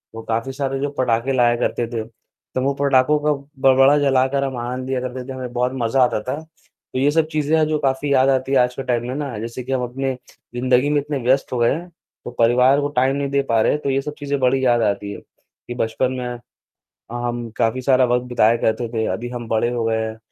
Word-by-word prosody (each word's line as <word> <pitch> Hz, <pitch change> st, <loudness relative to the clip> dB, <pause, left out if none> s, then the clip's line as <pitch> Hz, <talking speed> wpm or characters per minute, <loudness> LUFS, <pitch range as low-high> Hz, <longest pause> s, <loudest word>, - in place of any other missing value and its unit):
वो 115 Hz, -, -6 dB
काफ़ी 115 Hz, +4 st, -2 dB
सारे 135 Hz, 0 st, -2 dB
जो 145 Hz, +1 st, -1 dB
पटाखे 125 Hz, +1 st, +1 dB
लाया 120 Hz, -2 st, +3 dB
करते 120 Hz, -1 st, -1 dB
थे। 115 Hz, -2 st, -4 dB, 0.5 s
तो 130 Hz, -, +1 dB
वो 140 Hz, +1 st, +1 dB
पटाखों 140 Hz, +1 st, +3 dB
का 150 Hz, -, +4 dB, 0.4 s
बड़ा 135 Hz, +3 st, +5 dB
जलाकर 135 Hz, 0 st, +2 dB
हम 130 Hz, -2 st, -3 dB
आनंद 125 Hz, +2 st, -4 dB
लिया 130 Hz, -1 st, 0 dB
करते 130 Hz, 0 st, -5 dB
थे 135 Hz, -, -5 dB
हमें 130 Hz, -2 st, -6 dB
बहुत 125 Hz, +1 st, 0 dB
मजा 125 Hz, +3 st, +3 dB
आता 115 Hz, -3 st, +1 dB
था। 130 Hz, +6 st, -4 dB
तो 160 Hz, -4 st, -11 dB
ये 145 Hz, +2 st, +3 dB
सब 160 Hz, 0 st, +2 dB
चीज़ें 155 Hz, +1 st, +1 dB
हैं 155 Hz, -, +3 dB
जो 155 Hz, -1 st, 0 dB
काफ़ी 140 Hz, 0 st, 0 dB
याद 130 Hz, +1 st, +4 dB
आती 135 Hz, 0 st, 0 dB
है 135 Hz, -, +4 dB
आज 125 Hz, 0 st, -2 dB
के 135 Hz, -, -4 dB
टाइम 120 Hz, -1 st, -1 dB
में 130 Hz, -, -4 dB
ना। 140 Hz, -7 st, -4 dB
जैसे 115 Hz, +2 st, -6 dB
कि 135 Hz, -, -6 dB
हम 130 Hz, -1 st, 0 dB
अपने 130 Hz, +2 st, -2 dB, 0.4 s
ज़िंदगी 125 Hz, +3 st, +2 dB
में 150 Hz, -1 st, +2 dB
इतने 145 Hz, 0 st, -3 dB
व्यस्त 130 Hz, +2 st, +2 dB
हो -, -, -1 dB
गए 120 Hz, +2 st, +3 dB
हैं 175 Hz, +4 st, -6 dB, 0.4 s
तो 120 Hz, -, -5 dB
परिवार 125 Hz, +4 st, +4 dB
को 145 Hz, -, 0 dB
टाइम 130 Hz, +2 st, +2 dB
नहीं 140 Hz, -1 st, -2 dB
दे 140 Hz, 0 st, +2 dB
पा 115 Hz, -4 st, +1 dB
रहे -, -, +3 dB
हैं, 150 Hz, -, -1 dB
तो 140 Hz, -, -2 dB
ये 135 Hz, +1 st, +1 dB
सब 150 Hz, +1 st, -6 dB
चीजें 140 Hz, -1 st, -2 dB
बड़ी 130 Hz, +1 st, +2 dB
याद 120 Hz, -1 st, +3 dB
आती 100 Hz, -1 st, -1 dB
है -, -, -7 dB
कि, 120 Hz, -, -14 dB
बचपन 125 Hz, +3 st, -1 dB
में 125 Hz, -1 st, -5 dB, 0.7 s
हम 120 Hz, -1 st, -3 dB
काफ़ी 120 Hz, +2 st, +1 dB
सारा 130 Hz, -1 st, +4 dB
वक़्त 125 Hz, 0 st, +1 dB
बिताए 115 Hz, -1 st, +3 dB
करते 115 Hz, +1 st, 0 dB
थे। 110 Hz, -1 st, 0 dB
अभी 120 Hz, +1 st, -5 dB
हम 120 Hz, -2 st, -6 dB
बड़े 115 Hz, +2 st, +1 dB
हो 120 Hz, -2 st, -2 dB
गए 110 Hz, 0 st, +1 dB
हैं, 110 Hz, 0 st, -4 dB
130 Hz, 245 wpm, -21 LUFS, 120-135 Hz, 0.7 s, बड़ा